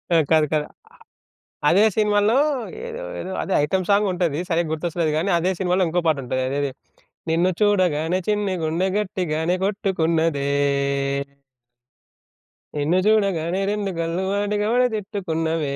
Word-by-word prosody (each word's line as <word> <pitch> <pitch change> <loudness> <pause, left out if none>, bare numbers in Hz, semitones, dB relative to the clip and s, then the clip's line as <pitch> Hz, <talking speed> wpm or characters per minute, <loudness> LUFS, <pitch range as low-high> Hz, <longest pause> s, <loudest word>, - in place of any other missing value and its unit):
ఆ! - - +6
కాదు. 155 -1 +5
కదా 150 -1 0
అ - - -35 1.0
అదే 195 +4 +5
సినిమాలో 210 +1 +3 0.5
ఏదో, 485 +1 -6 0.2
ఏదో 190 - -5
అదే 190 - -2
ఐటెమ్ 185 +5 0
సాంగ్ 205 +1 +4
ఉంటది. 170 -4 -1
సరిగ్గా 170 -1 0
గుర్తొస్తలేదు 165 0 -1
కానీ 175 +5 0
అదే 185 +3 +1
సినిమాలో 185 0 +1
ఇంకో 175 +2 0
పాట 155 -3 +3
ఉంటది. 130 +1 -2
అదేది? 140 0 -1 0.6
నిన్ను 170 +3 +2
చూడగానే 185 -5 +2
చిన్ని 205 -2 0
గుండె 165 +4 0
గట్టిగానే 180 -5 -1
కొట్టుకున్నదే. 165 -7 0 2.3
నిన్ను 150 +5 +1
చూడగానే 195 -5 +2
రెండు 205 -1 -2
కళ్ళు 165 +3 -1
వాటికవే 210 +4 +1
తిట్టుకున్నవే 165 -7 -2
180 Hz, 125 wpm, -22 LUFS, 160-205 Hz, 2.3 s, ఆ